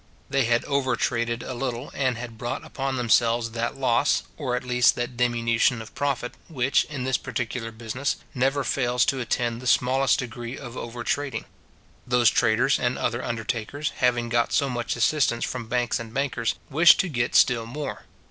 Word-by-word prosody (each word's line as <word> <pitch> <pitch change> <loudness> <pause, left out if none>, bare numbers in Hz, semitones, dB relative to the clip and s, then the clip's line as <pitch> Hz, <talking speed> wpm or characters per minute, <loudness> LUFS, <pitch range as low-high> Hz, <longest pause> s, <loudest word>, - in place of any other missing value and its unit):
They 135 -3 +2
had 120 0 +1
over 140 -3 +1
traded 115 0 -1
a - - -5
little, 125 0 -4
and 130 -3 0
had 120 -1 -7
brought 120 0 -4
upon 135 0 -3
themselves 115 -1 +2
that 120 +3 -3
loss, 125 -3 +2
or 130 -5 -2
at 125 - -3
least 125 -1 +3
that 120 0 -3
diminution 120 0 +2
of 110 -1 -10
profit, 135 -4 -2
which, 135 -3 +1
in 145 -4 -5
this 130 -1 0
particular 115 -1 -4
business, 115 +5 -3 0.2
never 135 +1 +1
fails 125 -2 +1
to 135 - 0
attend 120 -1 -1
the 130 - -6
smallest 130 +3 +3
degree 120 0 -5
of 120 -3 -9
over 120 0 -6
trading. 145 +1 -2 0.6
Those 120 -2 +4
traders 120 +5 +3
and 125 0 0
other 120 +1 -1
undertakers, 115 +5 -3
having 120 -1 +2
got 120 0 +1
so 140 -3 +1
much 120 -1 -2
assistance 120 -1 +2
from 125 -3 -5
banks 120 0 0
and 115 -1 -7
bankers, 130 -3 -1 0.2
wished 165 +5 +7
to 190 - -3
get 120 -7 -1
still 115 -2 +4
more. 145 +5 -6
120 Hz, 175 wpm, -25 LUFS, 115-130 Hz, 0.6 s, wished